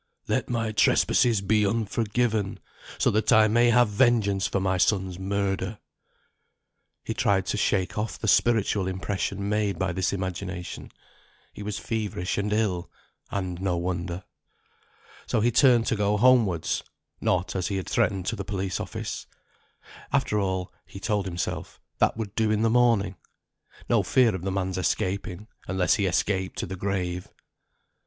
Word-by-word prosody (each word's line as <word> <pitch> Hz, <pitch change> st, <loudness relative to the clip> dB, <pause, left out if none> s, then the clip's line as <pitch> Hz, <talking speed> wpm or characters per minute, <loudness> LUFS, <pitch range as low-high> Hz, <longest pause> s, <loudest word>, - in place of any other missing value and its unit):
"Let -, -, 0 dB
my 115 Hz, -2 st, -1 dB
trespasses 110 Hz, 0 st, +3 dB
be 105 Hz, +2 st, +2 dB
unforgiven, 110 Hz, 0 st, 0 dB, 0.4 s
so -, -, +2 dB
that 110 Hz, +1 st, +1 dB
I 110 Hz, 0 st, +6 dB
may 120 Hz, +2 st, +4 dB
have 120 Hz, 0 st, +5 dB
vengeance 105 Hz, -3 st, +2 dB
for 100 Hz, -, -1 dB
my 95 Hz, -1 st, 0 dB
son's 95 Hz, -1 st, +1 dB
murder." 100 Hz, +1 st, -2 dB, 1.3 s
He -, -, -3 dB
tried 95 Hz, -2 st, +1 dB
to -, -, -1 dB
shake 95 Hz, -1 st, 0 dB
off 110 Hz, +1 st, -3 dB
the 110 Hz, -, -4 dB
spiritual 105 Hz, -3 st, +3 dB
impression 100 Hz, +1 st, -2 dB
made 105 Hz, -3 st, 0 dB
by 95 Hz, -1 st, -1 dB
this 95 Hz, +1 st, 0 dB
imagination. 95 Hz, -1 st, -5 dB, 0.6 s
He -, -, -9 dB
was 105 Hz, 0 st, -4 dB
feverish 105 Hz, -5 st, -2 dB
and 105 Hz, +1 st, -1 dB
ill, 105 Hz, -5 st, 0 dB, 0.4 s
and 95 Hz, -3 st, -3 dB
no 95 Hz, -2 st, 0 dB
wonder. 85 Hz, 0 st, -3 dB, 1.0 s
So -, -, +1 dB
he 120 Hz, +3 st, +2 dB
turned 120 Hz, -2 st, +5 dB
to -, -, +1 dB
go 105 Hz, 0 st, +1 dB
homewards; 110 Hz, -9 st, +3 dB, 0.4 s
not, 90 Hz, 0 st, 0 dB
as 90 Hz, -2 st, -1 dB
he 100 Hz, -, -2 dB
had 95 Hz, -, -4 dB
threatened, 100 Hz, -5 st, +1 dB
to 115 Hz, -, -1 dB
the 100 Hz, -, -5 dB
police 95 Hz, -1 st, -3 dB
office. -, -, -5 dB, 0.8 s
After 135 Hz, -6 st, +1 dB
all 95 Hz, -2 st, -2 dB
(he 100 Hz, -, -10 dB
told 105 Hz, 0 st, -1 dB
himself), 85 Hz, -2 st, -4 dB, 0.2 s
that -, -, +2 dB
would 105 Hz, -3 st, -4 dB
do 110 Hz, -1 st, +1 dB
in 110 Hz, +1 st, +1 dB
the 115 Hz, -, +3 dB
morning. 115 Hz, -6 st, +3 dB, 0.7 s
No -, -, +3 dB
fear 125 Hz, -4 st, +3 dB
of 95 Hz, -, -4 dB
the 95 Hz, +2 st, -2 dB
man's 95 Hz, -1 st, -2 dB
escaping, 95 Hz, +2 st, -2 dB, 0.2 s
unless 95 Hz, -1 st, +2 dB
he 100 Hz, -3 st, +1 dB
escaped 95 Hz, +1 st, 0 dB
to -, -, -2 dB
the 95 Hz, -, -6 dB
grave. 90 Hz, -2 st, -2 dB
100 Hz, 155 wpm, -26 LUFS, 95-110 Hz, 1.3 s, I